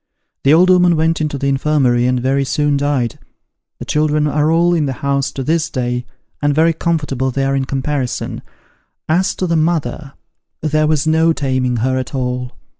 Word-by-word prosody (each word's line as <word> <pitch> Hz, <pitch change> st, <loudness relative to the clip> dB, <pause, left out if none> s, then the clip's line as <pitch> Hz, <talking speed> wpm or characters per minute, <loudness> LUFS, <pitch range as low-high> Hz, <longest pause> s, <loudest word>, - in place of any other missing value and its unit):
The 135 Hz, -, +4 dB
old 180 Hz, +3 st, +5 dB
'ooman 180 Hz, -1 st, +4 dB
went 160 Hz, +1 st, +1 dB
into 150 Hz, -2 st, -2 dB
the 140 Hz, -, -4 dB
infirmary, 135 Hz, -3 st, +2 dB
and 125 Hz, 0 st, +1 dB
very 135 Hz, +2 st, +1 dB
soon 145 Hz, +1 st, 0 dB
died. 140 Hz, -4 st, -1 dB, 0.6 s
The -, -, -8 dB
children 150 Hz, 0 st, +1 dB
are 150 Hz, +1 st, +1 dB
all 170 Hz, +1 st, +3 dB
in 155 Hz, -4 st, +1 dB
the 135 Hz, -, -2 dB
house 140 Hz, -1 st, 0 dB
to 135 Hz, -, -4 dB
this 160 Hz, +3 st, 0 dB
day, 125 Hz, -2 st, -3 dB, 0.3 s
and 145 Hz, -1 st, +1 dB
very 165 Hz, +2 st, +3 dB
comfortable 145 Hz, -6 st, -1 dB
they 135 Hz, +1 st, -1 dB
are 135 Hz, 0 st, 0 dB
in 135 Hz, -1 st, 0 dB
comparison. 135 Hz, -1 st, -3 dB, 0.7 s
As 180 Hz, +5 st, +1 dB
to 185 Hz, -, -2 dB
the 165 Hz, -2 st, 0 dB
mother, 155 Hz, -3 st, -1 dB, 0.5 s
there 155 Hz, 0 st, +1 dB
was 155 Hz, -1 st, +1 dB
no 160 Hz, +1 st, +3 dB
taming 130 Hz, -4 st, -1 dB
her 130 Hz, 0 st, 0 dB
at 130 Hz, -, -6 dB
all. 125 Hz, -1 st, -3 dB
145 Hz, 185 wpm, -17 LUFS, 130-160 Hz, 0.7 s, old